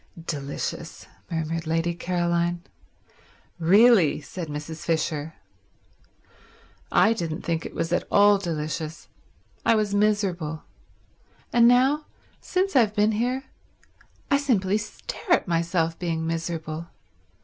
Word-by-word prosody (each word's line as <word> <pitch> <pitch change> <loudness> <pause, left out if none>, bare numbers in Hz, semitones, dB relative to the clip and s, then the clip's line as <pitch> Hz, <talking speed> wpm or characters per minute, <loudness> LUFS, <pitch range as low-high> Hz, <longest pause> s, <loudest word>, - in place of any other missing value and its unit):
"Delicious," 140 -3 -5 0.2
murmured 165 0 -3
Lady 165 +1 0
Caroline. 175 0 -1 1.0
"Really—" 195 -1 +5
said 165 +3 -7
Mrs. 150 +2 -6
Fisher. 160 -1 -1 1.6
"I 220 - +5
didn't 165 -7 -4
think 165 -1 -2
it - - -13
was 165 +1 -1
at - - 0
all 205 0 +5
delicious. 155 -2 -4 0.5
I 230 - +4
was 210 -2 0
miserable. 195 -7 0 0.9
And 235 -1 +6
now, 265 +5 +3 0.3
since 380 -1 -1
I've 220 -5 +4
been 210 0 +3
here, 245 +5 -1 0.9
I 280 - +6
simply 215 -8 +1
stare 280 - -3
at - - +2
myself 165 -1 0
being 165 -2 -2
miserable. 165 -1 -4
175 Hz, 110 wpm, -25 LUFS, 160-210 Hz, 1.6 s, And